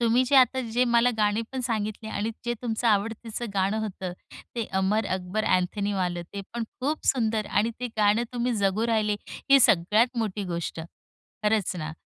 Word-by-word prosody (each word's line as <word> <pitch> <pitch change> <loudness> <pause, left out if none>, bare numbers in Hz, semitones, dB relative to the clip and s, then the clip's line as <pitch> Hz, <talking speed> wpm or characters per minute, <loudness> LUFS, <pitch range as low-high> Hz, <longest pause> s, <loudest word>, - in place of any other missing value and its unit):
तुम्ही 235 +1 +3
जे 275 +2 +3
आता, 260 0 +5
जे 245 +2 +3
मला 235 0 +4
गाणी 210 +1 +2
पण 260 - -2
सांगितले, 220 -2 -3
आणि 215 +1 -2
जे 240 - 0
तुमचं 235 0 -1
आवडतीचं 225 +2 -1
गाणं 195 +3 +1
होतं, 190 -4 -4 0.4
ते 230 - 0 0.2
अमर 205 +2 +1
अकबर 190 +4 -3
अँथनीवालं, 185 -1 0
ते 200 - -3
पण 235 - -2 0.2
खूप 295 +4 -2
सुंदर, 220 -4 +1
आणि 215 +3 +1
ते 250 - -1
गाणं 210 +2 +3
तुम्ही 245 0 0
जगू 195 +4 +2
राहिले, 215 -2 +1 0.3
ही 275 0 +8
सगळ्यात 215 +5 +4
मोठी 210 -2 -2
गोष्ट. 170 -1 -4 0.6
खरंच 210 -3 +1
ना. 155 -1 -4
220 Hz, 170 wpm, -26 LUFS, 200-235 Hz, 0.6 s, ही